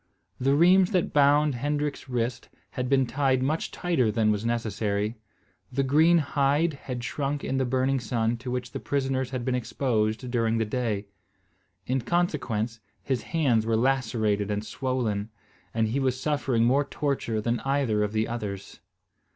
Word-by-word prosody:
The 135 +2 +2
rheims 180 +4 +5
that 180 - +1
bound 145 +1 +4
Hendrik's 145 +2 -2
wrists 120 -1 -2 0.2
had 125 0 -3
been 135 -1 +3
tied 130 0 +1
much 155 +4 -1
tighter 135 -11 0
than 110 -1 +2
was 105 0 -1
necessary. 110 -2 -1 0.6
The 135 +2 0
green 155 +6 +5
hide 145 +1 +1
had 125 -3 -6
shrunk 140 +4 -2
in 135 - -1
the 130 - +1
burning 130 +2 +1
sun 115 0 -1
to 125 +2 -7
which 125 -1 -3
the - - -5
prisoners 135 -2 -1
had 125 -2 -4
been 130 - 0
exposed 120 -2 -1
during 115 -2 +1
the 110 - +1
day. 110 -3 -2 0.8
In 130 +1 0
consequence, 120 -7 -1 0.2
his 130 -2 -1
hands 135 -10 +1
were 115 -1 +2
lacerated 110 -5 +1
and 105 +1 -2
swollen, 115 -6 -2 0.4
and 110 -1 0
he 130 +5 0
was 130 -1 0
suffering 130 -5 +1
more 135 +5 +3
torture 140 -6 -2
than 115 +2 0
either 135 -6 0
of 105 0 0
the 110 0 0
others. 100 -4 -6
125 Hz, 160 wpm, -27 LUFS, 115-140 Hz, 0.8 s, rheims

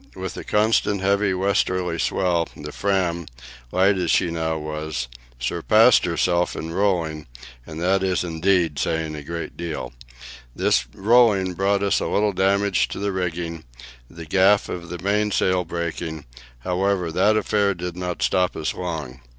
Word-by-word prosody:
With - - -5
the - - -7
constant 105 -1 +2
heavy 100 +1 +2
westerly 90 -2 0
swell, 85 -3 0
the 75 0 -7
Fram, 90 -4 -1 0.4
light 95 +1 +3
as 90 -2 -1
she 85 -3 +2
now 80 -1 -1
was, 75 -4 -4 0.3
surpassed 110 - +4
herself 85 0 +1
in 80 - -5
rolling, 85 -6 0 0.4
and 80 0 -7
that 95 +2 +2
is 95 -2 0
indeed 85 -3 +1
saying 80 +2 -1
a 75 - -6
great 85 +3 -6
deal. 85 -6 -5 0.6
This 65 - +2
rolling 105 -3 +4
brought 100 +2 +1
us 100 - +2
a - - -2
little 105 0 +1
damage 100 +1 +2
to - - -7
the 100 +1 -1
rigging, 85 -3 -3 0.5
the 85 -1 -10
gaff 95 +5 +3
of 85 -1 -6
the 90 - -5
mainsail 100 -2 +1
breaking; 80 -2 -4 0.4
however, 90 +1 0
that 105 +6 +3
affair 100 -2 +1
did 90 0 -5
not 90 -1 -3
stop 90 -1 +1
us - - -2
long. 80 -8 -5
90 Hz, 150 wpm, -23 LUFS, 80-100 Hz, 0.6 s, surpassed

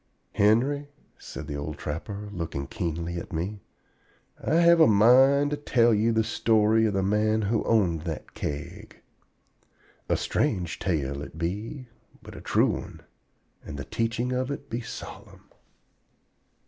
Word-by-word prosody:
Henry," 130 +8 +2 0.3
said 80 - -8
the 75 -1 -5
Old 70 +1 -5
Trapper, 100 +7 -5
looking 80 -7 -4
keenly 85 +3 -4
at 85 - -7
me, 95 +5 -3 0.8
"I 155 - +1
have 170 0 +6
a 160 - +7
mind 130 +7 +5
to 150 - -1
tell 120 -5 +3
you 110 +2 +2
the 110 0 +2
story 110 0 +3
of 100 - -2
the 95 - +1
man 105 +2 +1
who 110 +2 0
owned 90 -8 +2
that 80 -3 -6
Keg. 75 0 -6 1.1
A - - +2
strange 90 -2 -1
tale 70 -6 -1
it 75 - -9
be, 105 - -4 0.4
but - - -11
a - - -9
true - - +2
one, - - -7 0.6
and 75 - -8
the 70 - -6
teachings 115 +2 -1
of 130 +1 -1
it 140 - -6
be 115 +2 -2
solemn." - - -10
105 Hz, 150 wpm, -26 LUFS, 85-120 Hz, 1.1 s, a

